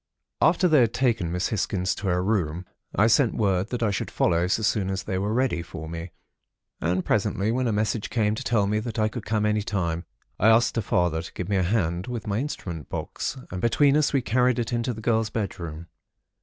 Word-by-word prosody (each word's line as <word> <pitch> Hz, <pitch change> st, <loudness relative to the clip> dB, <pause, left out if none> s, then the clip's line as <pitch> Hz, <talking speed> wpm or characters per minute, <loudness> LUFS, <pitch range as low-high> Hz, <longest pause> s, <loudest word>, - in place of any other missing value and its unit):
"After 175 Hz, +3 st, +4 dB
they 155 Hz, -4 st, +5 dB
had 115 Hz, -2 st, +2 dB
taken 115 Hz, -10 st, +1 dB
Miss 90 Hz, +1 st, -1 dB
Hisgins 95 Hz, -3 st, 0 dB
to 100 Hz, -, -4 dB
her 90 Hz, 0 st, +1 dB
room, 90 Hz, -4 st, -1 dB, 0.3 s
I 105 Hz, -, +4 dB
sent 115 Hz, +1 st, +3 dB
word 100 Hz, -2 st, +1 dB
that 125 Hz, -1 st, -2 dB
I 105 Hz, -, +2 dB
should 100 Hz, -, -3 dB
follow 85 Hz, +1 st, +1 dB
so 110 Hz, +4 st, 0 dB
soon 100 Hz, -2 st, +1 dB
as 95 Hz, 0 st, -2 dB
they 95 Hz, -3 st, -2 dB
were 100 Hz, +2 st, -1 dB
ready 120 Hz, -7 st, +1 dB
for 80 Hz, -1 st, -8 dB
me. 85 Hz, +2 st, -6 dB, 0.7 s
And, 90 Hz, +3 st, 0 dB
presently, 105 Hz, 0 st, +1 dB
when 125 Hz, +1 st, 0 dB
a -, -, +1 dB
message 105 Hz, +1 st, -1 dB
came 105 Hz, -3 st, +1 dB
to 110 Hz, -, -4 dB
tell 110 Hz, -4 st, +2 dB
me 105 Hz, +2 st, +1 dB
that 115 Hz, 0 st, -5 dB
I 110 Hz, -1 st, +3 dB
could -, -, -7 dB
come 110 Hz, -1 st, +1 dB
any 105 Hz, 0 st, +2 dB
time, 85 Hz, -6 st, -2 dB, 0.3 s
I 105 Hz, -, +4 dB
asked 115 Hz, +2 st, +4 dB
her 115 Hz, -, +1 dB
father 90 Hz, -5 st, +1 dB
to 80 Hz, -, -10 dB
give 90 Hz, +1 st, -5 dB
me 100 Hz, -, +2 dB
a -, -, +2 dB
hand 90 Hz, -2 st, 0 dB
with 120 Hz, -3 st, -4 dB
my 105 Hz, 0 st, -1 dB
instrument 85 Hz, -, -5 dB
box, -, -, -4 dB
and 90 Hz, 0 st, -4 dB
between 140 Hz, +5 st, +4 dB
us 150 Hz, -1 st, +3 dB
we 135 Hz, -3 st, +1 dB
carried 125 Hz, +2 st, +2 dB
it 120 Hz, 0 st, -2 dB
into 120 Hz, +1 st, 0 dB
the 110 Hz, -2 st, -7 dB
girl's 110 Hz, -1 st, +1 dB
bedroom. 85 Hz, -7 st, -4 dB
105 Hz, 225 wpm, -25 LUFS, 90-115 Hz, 0.7 s, they